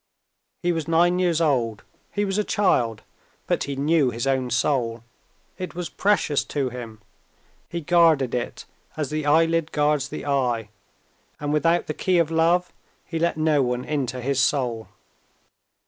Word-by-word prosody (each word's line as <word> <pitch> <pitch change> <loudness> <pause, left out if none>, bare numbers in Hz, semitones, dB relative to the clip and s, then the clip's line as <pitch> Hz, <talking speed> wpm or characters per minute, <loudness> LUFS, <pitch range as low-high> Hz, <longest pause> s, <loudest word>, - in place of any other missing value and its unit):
He 175 - +2
was 165 -2 -3
nine 175 +2 +3
years 175 -3 +2
old; 120 -9 0 0.3
he 205 0 0
was 195 +1 -1
a - - +2
child; 125 - +1 0.4
but - - 0
he 140 - -4
knew 145 0 +2
his 115 +1 -4
own 130 -2 0
soul, 120 -2 0 0.6
it 185 -2 -5
was 175 -2 -4
precious 195 -8 +1
to 140 -3 -2
him, 115 -3 -9 0.7
he 170 - -4
guarded 160 -6 +3
it 120 -1 -4 0.3
as 150 -2 -2
the 155 -1 -2
eyelid 165 +1 +3
guards 150 -1 +1
the - - -6
eye, 125 -6 0 0.7
and 145 0 -2
without 165 +3 +2
the 155 - -3
key 185 +3 +1
of 165 -2 +2
love 170 +2 +2 0.3
he 165 - -4
let 170 -1 0
no 155 -2 +2
one 125 0 -1
into 130 -4 -2
his 135 +2 0
soul. 125 -5 0
150 Hz, 160 wpm, -24 LUFS, 125-165 Hz, 0.7 s, nine